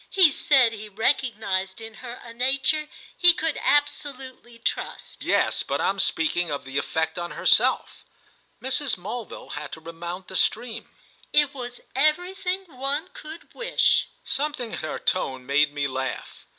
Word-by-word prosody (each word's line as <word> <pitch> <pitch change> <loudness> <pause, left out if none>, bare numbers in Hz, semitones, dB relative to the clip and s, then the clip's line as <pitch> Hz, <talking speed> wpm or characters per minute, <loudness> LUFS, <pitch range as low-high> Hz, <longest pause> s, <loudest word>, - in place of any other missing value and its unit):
"He 370 -6 +6
said 265 -4 +4
he 215 -1 -7
recognised 210 -4 0
in 225 0 -8
her 245 -2 -6
a 230 - -10
nature 265 +5 +1 0.3
he 355 -1 +7
could 325 -2 -1
absolutely 270 -4 -1
trust." 230 - -3
"Yes, - - +2
but - - -2
I'm 195 0 +1
speaking 175 -1 +1
of 140 -1 -4
the 135 +1 -1
effect 160 +2 -1
on 175 0 -3
herself." - - +2 0.6
Mrs. 265 -2 0
Mulville 215 +6 -7
had 150 0 -6
to - - -6
remount 170 +3 -7
the 190 - -8
stream. 230 +4 0 0.4
"It 295 -1 +4
was 245 -2 -7
everything 360 +6 +2
one 285 +2 -3
could 315 +2 -10
wish." - - +3 0.2
Something 280 -5 -2
in - - -4
her 155 - -4
tone 130 -8 -1
made 145 +2 +3
me 145 -1 -1
laugh. 130 -2 -5
240 Hz, 150 wpm, -25 LUFS, 175-290 Hz, 0.6 s, he